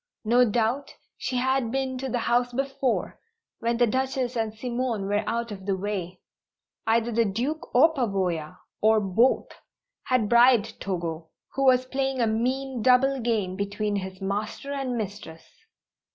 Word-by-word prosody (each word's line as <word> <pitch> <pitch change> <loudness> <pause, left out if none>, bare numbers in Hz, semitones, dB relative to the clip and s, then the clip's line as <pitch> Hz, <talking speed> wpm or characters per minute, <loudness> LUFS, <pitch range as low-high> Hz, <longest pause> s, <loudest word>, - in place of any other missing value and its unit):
No 240 +2 +4
doubt 235 +5 -1 0.2
she 255 - -4
had 260 -1 +1
been 265 0 -1
to 265 0 -3
the 245 - -1
house 245 +1 +2
before, 270 -1 -1 0.4
when 235 0 0
the 240 - +5
Duchess 260 +1 -1
and 225 -2 -1
Simone 235 -1 -2
were 205 +2 0
out 235 -1 -2
of 195 -1 -8
the 195 -1 +1
way. 185 -2 -4 0.7
Either 230 +1 +2
the 230 +1 +3
Duke 245 - -2
or 315 +6 +6
Pavoya 185 - -1 0.2
or 220 0 +5
both 215 +6 +2 0.6
had 255 -5 +2
bribed 235 -1 +4
Togo, 170 -4 -4 0.2
who 275 0 0
was 255 -1 +5
playing 265 0 -2
a 235 - +3
mean, 250 +3 -1
double 260 +3 +4
game 220 -6 -1
between 205 +1 -2
his 190 -1 -6
master 210 +7 -3
and 265 -3 -2
mistress! 200 -6 -6
235 Hz, 150 wpm, -26 LUFS, 205-255 Hz, 0.7 s, or